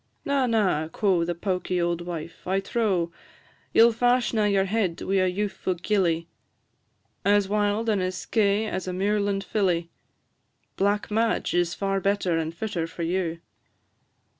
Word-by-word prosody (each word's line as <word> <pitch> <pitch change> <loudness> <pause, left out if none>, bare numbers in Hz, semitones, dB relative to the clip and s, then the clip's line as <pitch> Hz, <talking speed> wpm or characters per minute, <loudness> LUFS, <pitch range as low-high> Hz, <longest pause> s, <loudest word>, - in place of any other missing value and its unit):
"Na, 280 -3 +1
na," 195 -9 +1
quo' 180 0 +1
the 175 +1 -2
pawky 180 0 -1
auld 170 0 0
wife; 170 -1 -7
"I 190 +1 +2
trow 195 -5 0 0.6
You 225 - +7
'll - - +3
fash 245 +1 +2
na 215 -2 +2
your 200 -2 +2
head 195 -4 -1
wi' 195 +1 0
a 185 - +2
youthfu' 190 -2 -2
gilly, 170 -4 +1 1.0
As 205 -1 +3
wild 210 +2 0
and 210 -4 +2
as 185 0 -2
skeigh 210 0 +1
as 190 -2 -4
a 180 - -2
muirland 200 +1 0
filly; 180 -4 0 0.8
Black 205 +2 0
Madge 225 +1 +1
is 175 -1 +1
far 195 -1 -1
better 195 -3 +1
and 160 0 -1
fitter 170 -2 -3
for 170 +1 -6
you." 170 -1 -1
195 Hz, 155 wpm, -25 LUFS, 175-210 Hz, 1.0 s, You